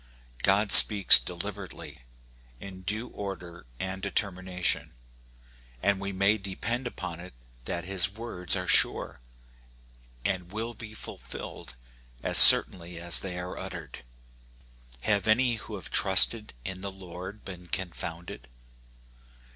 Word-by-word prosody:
God 100 +1 +1
speaks 100 -4 +10
deliberately, - - -5 0.6
in 95 -1 -11
due 110 +6 -4
order 85 -7 -9
and 95 0 -6
determination, 95 -3 -3 0.9
and 100 -1 0
we 100 0 -5
may 100 +3 0
depend 115 +6 -5
upon 85 -7 -8
it 90 -6 -13 0.3
that 85 - -5
his 95 -1 -1
words 100 -5 -4
are 90 -1 -4
sure, - - +2 1.1
and 90 -2 -3
will 115 +3 -6
be 110 -1 -12
fulfilled 65 - -11 0.5
as - - +4
certainly 85 -1 +6
as 85 -2 +3
they 90 -2 -7
are 90 0 -7
uttered. - - -9 1.0
Have 105 - -1
any 120 +2 +1
who 105 0 -10
have 95 - -11
trusted 105 - +3
in 95 0 -7
the 100 - -6
Lord 95 +2 -11
been 90 -2 -11
confounded 85 -6 -7
95 Hz, 120 wpm, -26 LUFS, 90-105 Hz, 1.1 s, speaks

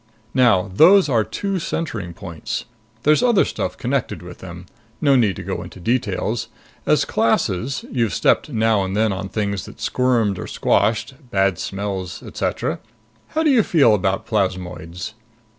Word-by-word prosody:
Now 105 -7 +3
those 180 - +6
are 115 -4 +3
two 195 - -3
centering 105 - -4
points. 85 -5 -5 0.4
There's 150 +1 +4
other 240 -5 +4
stuff - - -3
connected 130 -6 -2
with 90 0 -10
them. 90 -1 -9 0.3
No 140 -3 +4
need 110 -7 +3
to - - -7
go - - -3
into - - -10
details. 115 +1 -1 0.4
As - - +3
classes 120 +10 0
you've 115 -5 0
stepped - - +2
now 110 -5 +2
and 95 +1 -3
then 110 -2 +2
on 95 +1 -5
things 100 -2 -2
that - - -12
squirmed 115 -7 +1
or - - -5
squashed. 110 +5 +1 0.2
Bad 95 -3 +1
smells. 95 -3 -4
Etcetera. - - -2 0.6
How 320 - +3
do 305 - +4
you 250 -4 +5
feel 145 - +4
about 95 +1 0
plasmoids?" 90 -4 -3
105 Hz, 155 wpm, -21 LUFS, 95-130 Hz, 0.6 s, those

